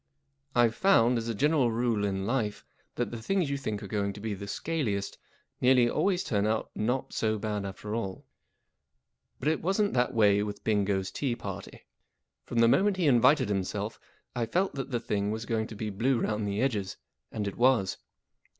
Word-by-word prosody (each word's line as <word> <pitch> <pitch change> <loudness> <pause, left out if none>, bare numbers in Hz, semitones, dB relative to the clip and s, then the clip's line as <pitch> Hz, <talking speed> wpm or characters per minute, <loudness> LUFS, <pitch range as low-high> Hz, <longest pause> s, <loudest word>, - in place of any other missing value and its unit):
I 120 -1 +6
'VE - - -10
found, 125 -9 +4
as 115 - -5
a 115 - -2
general 145 0 +3
rule 115 -2 0
in 95 -1 -2
life, 115 -3 -1 0.3
that 120 -3 -2
the 115 -1 -6
things 180 +1 0
you - - 0
think 110 -5 -4
are - - -6
going 100 0 -1
to 105 - -10
be 110 0 -3
the 100 +1 -7
scaliest 105 -8 -2 0.4
nearly 125 -1 +5
always 185 +8 +1
turn 105 -2 0
out 110 0 -1
not 125 +5 -1
so 110 -1 0
bad 105 -1 -3
after 105 +2 -6
all; 100 -5 -4 1.1
but 135 - -4
it 160 0 +1
wasn't 195 +3 +1
that 125 0 +1
way 105 -2 +4
with 105 0 -5
Bingo's 100 -3 0
tea 130 -5 -1
party. 100 -3 -8 0.6
From 120 - -5
the 115 - +6
moment 195 - +3
he 180 - +1
invited 125 0 +5
himself 100 +2 -2 0.4
I 120 -2 -1
felt 185 +10 0
that 135 -1 -4
the 120 -3 -1
thing 100 -3 -1
was 110 +2 -3
going 110 -1 -1
to 110 - -9
be 105 0 -4
blue 120 +5 +1
round 105 -2 -1
the 100 +2 -1
edges, 105 -8 -1 0.3
and 105 -2 -3
it 100 - -4
was. 120 -6 +3
110 Hz, 195 wpm, -29 LUFS, 100-130 Hz, 1.1 s, I